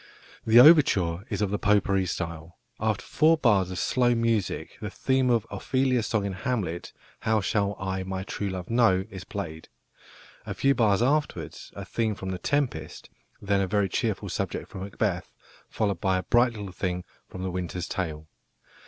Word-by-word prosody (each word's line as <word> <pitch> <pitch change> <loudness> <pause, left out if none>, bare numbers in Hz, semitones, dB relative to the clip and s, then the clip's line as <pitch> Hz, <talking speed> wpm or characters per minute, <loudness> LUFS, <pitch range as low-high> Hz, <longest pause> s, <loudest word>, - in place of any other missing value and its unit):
The 115 +2 +8
overture 100 - +6
is - - -1
of 100 - -1
the 105 - -1
"potpourri" 100 -2 +2
style. 85 0 -5 0.2
After - - -1
four 160 +2 +4
bars 105 - +3
of 90 - -5
slow 120 +2 +2
music 115 -4 -1
the - - -3
theme 130 -1 +1
of 115 -3 +2
Ophelia's 130 -3 0
song 110 -4 0
in 100 - -2
Hamlet, 95 -5 -3 0.3
"How 110 0 +1
shall 100 0 0
I 95 0 -2
my 95 0 -4
true 100 +1 -4
love 95 +2 -6
know?", 110 -6 +3
is 95 -1 -7
played. 80 -6 -6 0.7
A - - -5
few 135 0 +3
bars 110 -4 +3
afterwards 150 +4 -1
a - - -6
theme 110 -2 -1
from 95 0 -6
The 90 - -4
Tempest, 125 - -2 0.3
then 100 -1 +2
a 95 - 0
very 100 0 +1
cheerful - - -1
subject - - -3
from 95 - -7
Macbeth, 95 -2 -3 0.3
followed 100 -5 -1
by 95 -1 +2
a 95 - -2
bright 120 0 +3
little 100 -3 -7
thing 90 -1 -3 0.2
from 95 - -8
The 95 - -2
Winter's 90 -1 -4
Tale. 80 -4 -4
100 Hz, 175 wpm, -27 LUFS, 95-115 Hz, 0.7 s, The